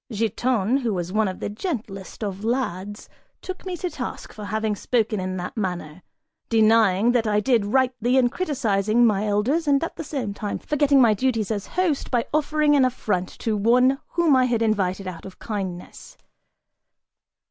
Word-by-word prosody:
Giton, 225 Hz, +2 st, 0 dB
who 235 Hz, -7 st, -1 dB
was 175 Hz, +1 st, -4 dB
one 215 Hz, -1 st, +2 dB
of 185 Hz, -, -5 dB
the -, -, -3 dB
gentlest 210 Hz, -, -5 dB
of 200 Hz, -1 st, -4 dB
lads, 205 Hz, -4 st, -3 dB, 0.4 s
took 375 Hz, 0 st, -7 dB
me 365 Hz, -1 st, -3 dB
to 360 Hz, -, -3 dB
task -, -, -6 dB
for 210 Hz, -2 st, -8 dB
having 215 Hz, +1 st, -1 dB
spoken 220 Hz, -1 st, 0 dB
in 185 Hz, 0 st, -3 dB
that 180 Hz, 0 st, -5 dB
manner, 180 Hz, -5 st, -4 dB, 0.5 s
denying 220 Hz, -1 st, +4 dB
that 235 Hz, -2 st, +1 dB
I 210 Hz, 0 st, +2 dB
did 225 Hz, -1 st, +2 dB
rightly 250 Hz, +1 st, +1 dB
in 250 Hz, -2 st, +4 dB
criticising 240 Hz, -, +1 dB
my 210 Hz, -1 st, +1 dB
elders 250 Hz, +11 st, +1 dB
and 280 Hz, +1 st, +3 dB
at 330 Hz, -, -5 dB
the -, -, -4 dB
same 260 Hz, -9 st, -4 dB
time 205 Hz, 0 st, -4 dB
forgetting 285 Hz, -2 st, +2 dB
my 230 Hz, -3 st, +5 dB
duties 225 Hz, -2 st, -1 dB
as 205 Hz, -2 st, -3 dB
host 345 Hz, -6 st, 0 dB
by 240 Hz, -2 st, +1 dB
offering 305 Hz, 0 st, +2 dB
an 275 Hz, -, +4 dB
affront 215 Hz, -8 st, -1 dB
to 220 Hz, -2 st, 0 dB
one 250 Hz, +6 st, +3 dB
whom 335 Hz, -5 st, +3 dB
I 255 Hz, -1 st, +4 dB
had 235 Hz, -2 st, +1 dB
invited 195 Hz, -3 st, 0 dB
out 175 Hz, -3 st, -7 dB
of 190 Hz, -, -11 dB
kindness. 190 Hz, -5 st, -6 dB
225 Hz, 175 wpm, -23 LUFS, 200-260 Hz, 0.5 s, my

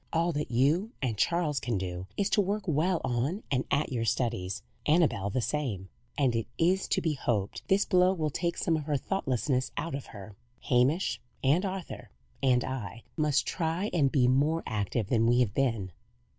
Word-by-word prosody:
All 170 Hz, +1 st, +1 dB
that 150 Hz, -1 st, -3 dB
you 150 Hz, -, +2 dB
and 125 Hz, -5 st, -1 dB
Charles 150 Hz, -, +1 dB
can 115 Hz, -3 st, -1 dB
do 90 Hz, 0 st, -4 dB
is 200 Hz, -, +2 dB
to 210 Hz, -, +4 dB
work 205 Hz, +2 st, -1 dB
well 170 Hz, +1 st, +1 dB
on 130 Hz, -, -1 dB, 0.3 s
at 145 Hz, -, +1 dB
your 120 Hz, -3 st, -1 dB
studies 115 Hz, -6 st, -1 dB, 0.2 s
Annabel 150 Hz, -, +3 dB
the 125 Hz, +5 st, -1 dB
same; 110 Hz, -12 st, -2 dB, 0.3 s
and 130 Hz, -5 st, +2 dB
it 115 Hz, -, -1 dB
is 185 Hz, +3 st, +2 dB
to -, -, +1 dB
be 160 Hz, -2 st, 0 dB
hoped 110 Hz, -8 st, -1 dB
this 195 Hz, +1 st, +3 dB
blow 180 Hz, -1 st, +4 dB
will 155 Hz, -5 st, -1 dB
take 170 Hz, +4 st, -1 dB
some 165 Hz, -, +1 dB
of 155 Hz, -2 st, -3 dB
her 145 Hz, -2 st, +1 dB
thoughtlessness 130 Hz, -, -1 dB
out 160 Hz, 0 st, -3 dB
of 140 Hz, -1 st, -5 dB
her. 100 Hz, -1 st, -10 dB, 0.3 s
Hamish, 130 Hz, +9 st, +2 dB, 0.2 s
and 145 Hz, +8 st, +3 dB
Arthur, 190 Hz, -2 st, -5 dB, 0.3 s
and 125 Hz, -2 st, +3 dB
I, 115 Hz, -4 st, -5 dB
must 150 Hz, -2 st, +2 dB
try 170 Hz, +4 st, -1 dB
and 145 Hz, -6 st, +3 dB
be 125 Hz, -3 st, +3 dB
more 145 Hz, +6 st, +2 dB
active 105 Hz, +1 st, -1 dB
than 115 Hz, +2 st, +2 dB
we 120 Hz, +1 st, +4 dB
have 105 Hz, -5 st, +1 dB
been." 115 Hz, -8 st, 0 dB
135 Hz, 185 wpm, -29 LUFS, 115-165 Hz, 0.3 s, to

